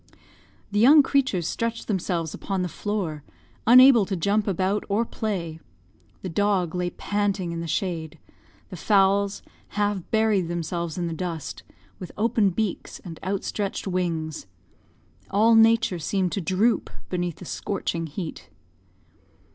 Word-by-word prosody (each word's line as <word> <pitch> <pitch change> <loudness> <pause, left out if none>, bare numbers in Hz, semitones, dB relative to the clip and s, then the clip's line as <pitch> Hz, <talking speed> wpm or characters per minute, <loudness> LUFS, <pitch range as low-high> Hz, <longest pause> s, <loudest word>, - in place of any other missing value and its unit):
The 205 - +1
young 285 +6 +8
creatures 260 - +1
stretched 230 0 -3
themselves 175 -5 -1
upon 195 -2 -3
the - - -1
floor, 180 -5 -3 0.5
unable 250 -1 +8
to 195 - -2
jump 200 +5 +1
about 195 +2 0
or 215 +4 +1
play; 175 -9 -4 0.6
the - - -3
dog 185 -1 +1
lay 180 -1 -1
panting 200 -2 -2
in 170 - -4
the 170 - -4
shade; 160 -3 -3 0.5
the 185 - -7
fowls 200 +2 +2 0.3
half 205 -2 +1
buried 220 -5 +2
themselves 170 0 -3
in 175 - -1
the 165 - -3
dust, 165 -2 -5 0.4
with 180 - -8
open 220 -1 +2
beaks 200 +1 -3
and 165 -3 -8
outstretched 200 +1 -3
wings; 165 - -2 0.8
all 215 +4 +4
nature 225 -4 +4
seemed 185 +2 -1
to 200 - -2
droop 195 +7 +1 0.2
beneath 175 -3 -2
the 180 - -11
scorching 170 -3 -3
heat. 160 +2 -7
190 Hz, 135 wpm, -25 LUFS, 170-210 Hz, 0.8 s, young